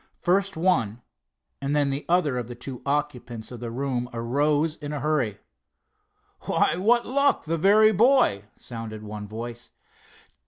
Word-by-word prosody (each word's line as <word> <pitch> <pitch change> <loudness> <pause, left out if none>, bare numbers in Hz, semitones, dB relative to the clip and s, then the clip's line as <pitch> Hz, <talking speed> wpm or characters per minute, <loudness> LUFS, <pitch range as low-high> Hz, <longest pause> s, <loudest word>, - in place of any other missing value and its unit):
First 195 +1 +1
one, 125 - +1 0.6
and 140 +1 -1
then 145 -2 +2
the 140 +2 -4
other 155 -8 +2
of 120 - -5
the 120 - -8
two 125 +1 -7
occupants 130 -6 -3
of 120 - -8
the 120 0 -5
room 125 0 -2
arose 145 +7 +1
in 145 -1 -6
a 145 - -3
hurry. 135 -8 0 1.1
"Why, - - +2
what 235 +6 +3
luck—the 265 - +1
very 215 +5 +6
boy!" 225 - +3
sounded 115 -2 -7
one 105 -1 -7
voice. 115 +2 -6
140 Hz, 145 wpm, -25 LUFS, 120-175 Hz, 1.1 s, very